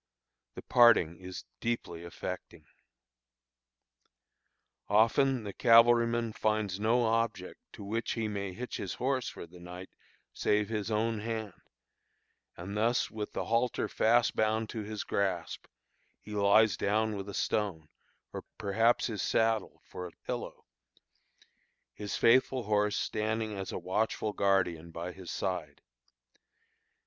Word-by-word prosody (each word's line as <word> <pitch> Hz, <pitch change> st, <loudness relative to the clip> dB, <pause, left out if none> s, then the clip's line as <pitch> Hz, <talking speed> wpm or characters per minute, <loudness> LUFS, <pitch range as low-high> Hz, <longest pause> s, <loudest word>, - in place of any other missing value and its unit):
The -, -, -8 dB
parting 115 Hz, -10 st, +5 dB
is 90 Hz, 0 st, -8 dB
deeply 100 Hz, -8 st, -3 dB
affecting. 85 Hz, -, -7 dB, 2.2 s
Often 120 Hz, +4 st, +3 dB
the 100 Hz, -2 st, -6 dB
cavalryman 115 Hz, 0 st, +5 dB
finds 105 Hz, -3 st, -1 dB
no 115 Hz, +3 st, +2 dB
object 115 Hz, -4 st, -1 dB
to -, -, -9 dB
which 110 Hz, +4 st, -2 dB
he 115 Hz, -2 st, -2 dB
may 100 Hz, -2 st, -3 dB
hitch 120 Hz, +7 st, -6 dB
his -, -, -4 dB
horse 130 Hz, 0 st, -1 dB
for -, -, -9 dB
the 90 Hz, +1 st, -15 dB
night 90 Hz, +2 st, -9 dB, 0.4 s
save 105 Hz, 0 st, +1 dB
his 110 Hz, -1 st, -2 dB
own 110 Hz, 0 st, 0 dB
hand; 110 Hz, -2 st, -4 dB, 1.0 s
and 95 Hz, +4 st, -6 dB
thus 115 Hz, +3 st, +1 dB
with 105 Hz, -1 st, -5 dB
the -, -, -3 dB
halter 115 Hz, +2 st, 0 dB
fast 120 Hz, +2 st, +2 dB
bound 110 Hz, 0 st, +1 dB
to 115 Hz, -, -5 dB
his 105 Hz, 0 st, -5 dB
grasp 95 Hz, -4 st, -2 dB, 0.5 s
he 105 Hz, -, -12 dB
lies 105 Hz, 0 st, +4 dB
down 110 Hz, +1 st, +1 dB
with 100 Hz, 0 st, -6 dB
a 100 Hz, -, -6 dB
stone, 95 Hz, -8 st, -1 dB, 0.5 s
or -, -, -5 dB
perhaps 115 Hz, +4 st, +2 dB
his 110 Hz, -5 st, -3 dB
saddle, 110 Hz, -2 st, 0 dB
for 90 Hz, -, -7 dB
a -, -, -12 dB
pillow, -, -, -5 dB, 1.3 s
his 105 Hz, -1 st, -4 dB
faithful 130 Hz, +1 st, +4 dB
horse 105 Hz, -1 st, +1 dB
standing 110 Hz, 0 st, -2 dB
as 95 Hz, -1 st, -5 dB
a -, -, -3 dB
watchful 105 Hz, +2 st, -1 dB
guardian 90 Hz, -5 st, +1 dB
by 85 Hz, +2 st, -6 dB
his 90 Hz, -1 st, -10 dB
side. 85 Hz, -7 st, -3 dB
105 Hz, 130 wpm, -31 LUFS, 95-115 Hz, 2.2 s, parting